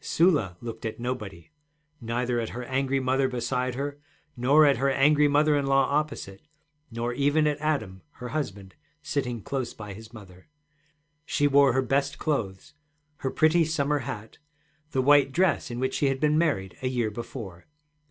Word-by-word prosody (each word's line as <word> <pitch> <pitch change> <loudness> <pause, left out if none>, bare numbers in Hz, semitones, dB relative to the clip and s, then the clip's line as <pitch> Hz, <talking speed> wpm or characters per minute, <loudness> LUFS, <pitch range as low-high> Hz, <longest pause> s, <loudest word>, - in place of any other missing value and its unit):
Sula 145 - +2
looked 115 -2 -7
at 110 0 -4
nobody, 115 - -5 0.5
neither 120 +1 -1
at 115 - -3
her 125 - -4
angry 135 +2 0
mother 130 +1 +1
beside 125 0 -2
her, 140 +2 -4 0.4
nor 140 +6 +5
at 140 -3 +4
her 135 +3 +1
angry 145 +2 +4
mother 150 +1 +3
in 140 -1 0
law 135 0 +4
opposite, 145 -10 -2 0.5
nor 120 +1 -3
even 145 +4 +2
at 150 -1 0
Adam 110 -12 -2
her 125 0 -8
husband, 100 -11 -4 0.3
sitting 130 -6 -3
close 130 -3 -3
by 105 -2 -8
his 110 +2 -12
mother. 95 -6 -14 0.8
She 145 0 0
wore 140 -2 +5
her 130 +1 +2
best 140 +2 0
clothes, 105 - -3 0.4
her 135 - -2
pretty 160 +4 +3
summer 150 -2 0
hat, 115 -4 -7 0.5
the 130 -3 0
white 140 0 +5
dress 170 -1 +1
in 120 0 -5
which 130 +1 -1
she 140 - +1
had 135 -1 0
been 150 +2 +2
married 145 - 0
a 130 - -1
year 120 -4 -1
before. 105 -5 -8
130 Hz, 170 wpm, -26 LUFS, 115-145 Hz, 0.8 s, nor